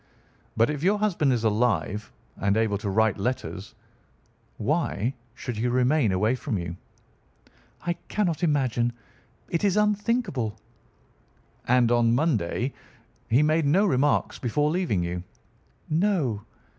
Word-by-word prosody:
But 115 +5 +4
if 145 -2 -4
your 195 +5 +3
husband 185 -9 +1
is 120 -3 0
alive 105 -3 0 0.2
and 100 +2 +1
able 110 -3 +1
to 105 - -3
write 110 0 +2
letters, 110 -3 -3 0.8
why 120 +6 0 0.2
should 125 -3 -5
he 115 +3 0
remain 125 -1 +2
away 105 +6 +2
from 130 -3 -2
you?" 85 -1 -5 1.1
"I 175 - +1
cannot 180 -7 -1
imagine. 130 -7 +1 0.5
It 170 - -2
is 200 -1 +2
unthinkable." 210 - 0 1.1
"And 120 -1 +4
on 120 -1 +3
Monday 130 - 0 0.6
he 125 +6 +4
made 155 0 +2
no 185 +8 +4
remarks 145 -5 +1
before 145 +5 +1
leaving 160 - 0
you?" 90 +1 -3 0.7
"No." 155 - 0
125 Hz, 125 wpm, -26 LUFS, 110-160 Hz, 1.1 s, But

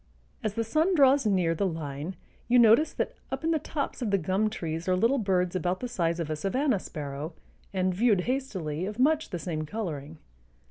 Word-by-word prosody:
As 210 -1 -2
the 230 - 0
sun 315 - +2
draws 275 -4 +5
near 180 -5 +2
the 195 +4 0
line 160 +1 -5 0.3
you 245 +1 +4
notice 235 +6 +6
that - - -2 0.2
up - - -3
in 325 - +1
the 320 - +2
tops 285 -2 -4
of 235 - 0
the 200 - +3
gum 190 +5 +1
trees 165 -5 -4
are 185 - +3
little 235 +9 +2
birds 185 -4 +1
about 180 +1 0
the 250 - -3
size 170 -7 -1
of 160 -2 -2
a - - 0
savanna 210 - +1
sparrow, 150 -1 -6 0.4
and, 185 -1 0
viewed 205 -1 +3
hastily, 185 - -2
of 210 +1 -6
much 305 +4 +2
the 175 - -3
same 155 -1 -3
coloring. 155 -5 -5
190 Hz, 200 wpm, -28 LUFS, 165-245 Hz, 0.4 s, notice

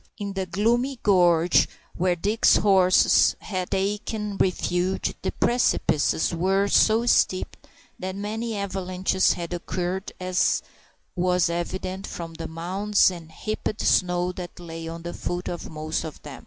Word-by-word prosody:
In 200 -3 -4
the 190 -1 -3
gloomy 240 +9 +1
gorge 175 -4 +4 0.3
where 180 0 +1
Dick's 205 +6 +3
horse 190 -3 +4
had 185 -3 -4
taken 210 +1 -2
refuge 185 0 0
the - - -2
precipices 175 -10 +1
were 190 +4 +1
so 220 +3 +4
steep 185 -5 +2 0.4
that 185 0 -4
many 220 +2 -3
avalanches 190 -1 0
had 170 0 -5
occurred, 180 +2 -3
as 185 0 +1 0.5
was 180 -1 +2
evident 185 +3 -4
from 165 -1 -7
the 165 0 -6
mounds 190 +5 +1
of 170 -3 -9
heaped 215 +5 -4
snow 180 0 +2
that 180 0 -8
lay 165 -1 -7
at 165 0 -7
the 175 - -5
foot 175 +1 -4
of 175 - -5
most 155 0 -3
of 160 -3 -8
them. - - -9
185 Hz, 140 wpm, -25 LUFS, 175-200 Hz, 0.5 s, gorge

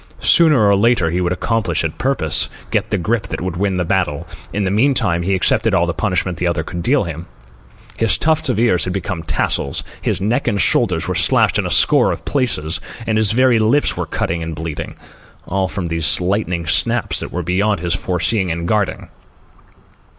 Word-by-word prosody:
Sooner 155 -10 +4
or 100 - +4
later 100 -5 +2
he 90 +2 -1
would 90 -1 -1
accomplish 95 -2 -1
his 80 - -1
purpose, 80 - 0 0.2
get - - -1
the - - 0
grip 110 +5 -1
that - - -5
would 90 -1 -4
win 95 0 -1
the 90 - -1
battle. 80 -6 -1 0.3
In 105 - -2
the 95 - -1
meantime, 110 -6 +2
he 95 +3 0
accepted 110 +3 +1
all 85 - +2
the 85 - -2
punishment 90 -3 -2
the 90 - 0
other 85 -2 -1
could 85 +2 -6
deal 130 +6 +2
him. 85 -2 -7 0.7
His 115 -1 +2
tufts 155 -3 +1
of 125 - 0
ears 115 -6 +2
had 90 - -3
become 95 -2 -4
tassels, 70 -3 -1 0.2
his - - -1
neck 115 +8 -1
and 100 - 0
shoulders - - +2
were - - -1
slashed - - +3
in - - -1
a - - -4
score - - +4
of - - -6
places, 95 - -1 0.2
and 110 - -1
his 110 -2 +3
very 125 0 +3
lips 115 +7 +2
were - - -4
cut - - -2
and 80 -1 -4
bleeding—all 80 +4 -6
from 95 -1 -5
these 85 -2 +3
lightning 90 -2 -1
snaps 75 - +1
that - - -5
were 90 - -3
beyond 95 +3 0
his 85 0 -2
foreseeing 95 +2 -1
and 85 +1 -3
guarding. 105 -1 -1
95 Hz, 195 wpm, -18 LUFS, 85-110 Hz, 0.7 s, Sooner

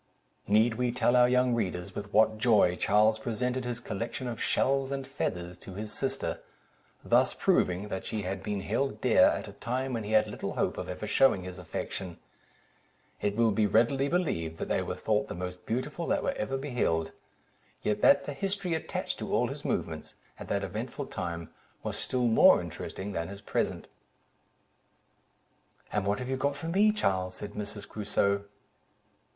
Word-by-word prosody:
Need 110 +3 +3
we 125 -1 +2
tell 125 0 +2
our 125 0 +6
young 125 0 +3
readers 90 -4 -2
with 100 +1 -6
what 110 0 +4
joy 110 -7 +4
Charles 110 +3 +3
presented 125 +3 -2
his 120 -1 -3
collection 120 +3 -4
of 115 -2 -5
shells 135 0 +1
and 135 -1 -3
feathers 90 - -4
to 95 - -10
his 105 +1 -5
sister, - - -2 0.7
thus - - +3
proving, 90 +3 +1
that 95 -1 -3
she 110 -2 -3
had 95 +1 -3
been 100 0 -3
held 110 +3 -1
dear, - - +5
at - - +1
a - - -8
time 130 +2 -2
when 115 -2 -2
he 105 +1 -4
had 110 0 +5
little 105 - -5
hope - - -1
of - - -5
ever - - -4
shewing 135 -9 +4
his 90 0 -7
affection; 90 +1 -5 1.0
it 100 0 0
will 115 0 +4
be 105 0 +2
readily 120 +7 +3
believed, 85 - -1
that - - -4
they - - +1
were - - -3
thought - - 0
the - - -6
most 90 +1 -6
beautiful 150 +8 -2
that - - +1
were - - +1
ever 135 - -2
beheld; 115 - 0 0.7
yet 105 0 0
that 140 0 +6
the 145 - -4
history 195 +3 -2
attached 160 - -3
to - - -5
all - - +2
his - - -7
movements, - - -3 0.2
at - - -8
that 100 0 -1
eventful 115 +9 -4
time, 85 -6 -5 0.3
was - - -3
still 125 -1 -1
more 115 -1 +7
interesting 100 +2 -6
than 85 -3 -2
his 100 +1 -9
present. - - -2 2.0
"And 105 -2 0
what 100 +1 +2
have 125 - -5
you 130 0 -1
got 140 +1 0
for 160 +4 -5
me, 205 +5 +4
Charles?" 95 - 0
said 105 - -7
Mrs. 105 0 -6
Crusoe. 100 -1 0
110 Hz, 180 wpm, -29 LUFS, 100-130 Hz, 2.0 s, more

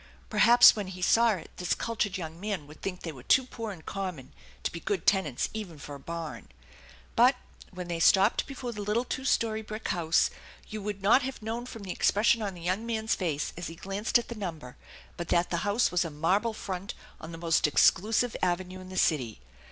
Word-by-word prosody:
Perhaps 240 +1 +8
when 205 -3 -4
he 185 -1 -8
saw 230 +3 +5
it 185 - -8
this 180 -1 0
cultured 215 -4 -2
young 165 -2 -7
man 200 -6 -3
would 150 +2 -15
think 185 -2 -4
they 165 - -4
were 135 -5 -12
too 260 - +4
poor 230 -3 -6
and 170 -5 -11
common 180 -9 -5 0.3
to - - -1
be 170 - -6
good 195 -1 -2
tenants 160 -11 +2
even 205 -7 -6
for 145 0 -9
a 140 - -8
barn. 160 -6 -6 0.7
But, 250 +3 +6 0.3
when 180 -1 -7
they 170 -1 -3
stopped 195 +5 +4
before 260 -3 -5
the 210 -3 -6
little 210 +4 0
two 260 +2 -4
story 220 -4 +1
brick 215 0 -6
house, 170 -1 +2 0.4
you 215 0 -6
would 200 -1 -5
not 225 +7 +6
have 260 -3 -5
known 230 +3 -4
from 225 -4 -9
the 190 - -5
expression 220 +5 +3
on 200 -3 -3
the 175 - -11
young 185 +6 -1
man's 220 -1 -1
face 155 -6 -2
as 175 - -5
he 165 - -8
glanced 195 +7 0
at 240 - -4
the - - -4
number 165 - -6 0.4
but 175 - -4
that 175 0 +1
the 170 - +1
house 205 +5 +1
was 180 0 +2
a 165 - -4
marble 190 +9 0
front 190 -2 -5 0.2
on 160 - -8
the 165 - -7
most 165 -2 +2
exclusive 220 - +3
avenue 185 +1 -1
in 185 0 -11
the 185 - -7
city. 130 -12 +1
190 Hz, 215 wpm, -29 LUFS, 170-220 Hz, 0.7 s, Perhaps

